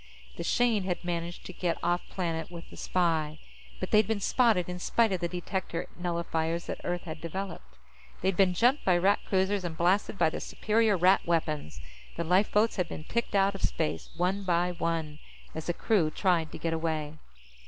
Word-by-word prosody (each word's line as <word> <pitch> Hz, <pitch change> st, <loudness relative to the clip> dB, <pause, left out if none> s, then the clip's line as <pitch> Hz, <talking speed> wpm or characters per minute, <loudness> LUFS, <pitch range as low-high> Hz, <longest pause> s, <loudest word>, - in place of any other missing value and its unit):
The -, -, -5 dB
Shane 230 Hz, -5 st, +2 dB
had 180 Hz, -1 st, -2 dB
managed 170 Hz, 0 st, -3 dB
to 185 Hz, -, -7 dB
get 170 Hz, -2 st, -1 dB
off 175 Hz, +1 st, +2 dB
planet 165 Hz, -3 st, -3 dB
with 170 Hz, -1 st, -9 dB
the -, -, -11 dB
spy, 160 Hz, -4 st, 0 dB, 0.4 s
but -, -, -4 dB
they'd 215 Hz, -1 st, +5 dB
been 220 Hz, -2 st, 0 dB
spotted 220 Hz, -4 st, +3 dB
in 180 Hz, 0 st, -5 dB
spite 225 Hz, +4 st, +2 dB
of 185 Hz, -, 0 dB
the 170 Hz, -, +1 dB
detector 175 Hz, -1 st, -3 dB
nullifiers 170 Hz, -1 st, -2 dB
that -, -, -5 dB
Earth 175 Hz, 0 st, -2 dB
had 160 Hz, -2 st, -7 dB
developed. 170 Hz, -, -6 dB, 0.4 s
They'd 190 Hz, 0 st, +1 dB
been 185 Hz, -1 st, +3 dB
jumped 250 Hz, +9 st, +3 dB
by 180 Hz, -2 st, +4 dB
Rat 195 Hz, +3 st, +3 dB
cruisers 190 Hz, 0 st, +1 dB
and 165 Hz, -2 st, -4 dB
blasted 190 Hz, +4 st, +2 dB
by 165 Hz, -3 st, +3 dB
the -, -, -4 dB
superior 220 Hz, -2 st, +1 dB
Rat 185 Hz, +3 st, +5 dB
weapons. 155 Hz, -, -1 dB, 0.4 s
The 170 Hz, -, -2 dB
lifeboats 205 Hz, +6 st, +3 dB
had 180 Hz, -2 st, 0 dB
been 155 Hz, -, -6 dB
picked 235 Hz, +5 st, -2 dB
out 195 Hz, 0 st, +4 dB
of 195 Hz, -, -8 dB
space, 160 Hz, -, -1 dB
one 185 Hz, +3 st, 0 dB
by 175 Hz, -1 st, +1 dB
one, 165 Hz, -3 st, -2 dB, 0.3 s
as 160 Hz, -, -6 dB
the 175 Hz, -, +1 dB
crew 190 Hz, -9 st, +2 dB
tried 165 Hz, -1 st, +1 dB
to -, -, -6 dB
get 165 Hz, -1 st, -2 dB
away. 160 Hz, -2 st, -2 dB
175 Hz, 190 wpm, -29 LUFS, 165-195 Hz, 0.4 s, they'd